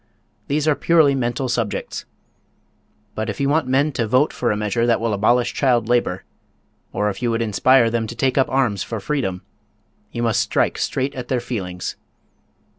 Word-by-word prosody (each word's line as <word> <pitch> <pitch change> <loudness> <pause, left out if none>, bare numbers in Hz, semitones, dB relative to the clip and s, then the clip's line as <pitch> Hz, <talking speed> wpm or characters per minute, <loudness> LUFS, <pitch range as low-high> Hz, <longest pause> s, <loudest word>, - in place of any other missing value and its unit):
These 150 +2 0
are 155 - +5
purely 155 -2 +3
mental 125 0 -1
subjects. 115 -4 -3 1.1
But 110 +1 -3
if 105 - -5
you 140 - +1
want 150 -2 +1
men 135 +4 +2
to 115 -4 -2
vote 130 +7 +2
for 120 - -1
a 105 - 0
measure 105 +3 0
that 120 - +3
will 115 -1 -1
abolish 120 +4 +2
child 120 -5 +2
labor, 120 -7 0 0.7
or 105 0 0
if 95 - -10
you 120 - 0
would 115 0 0
inspire 115 +2 +3
them 115 -1 -1
to 115 - -7
take 130 +2 0
up 135 - +2
arms 125 -6 +1
for 115 - -4
freedom, 95 -5 -2 0.7
you 120 - -3
must 115 -3 +2
strike - - 0
straight 135 +1 -1
at 125 -2 -6
their 130 -1 0
feelings. 95 -7 -5
120 Hz, 185 wpm, -21 LUFS, 110-135 Hz, 1.1 s, are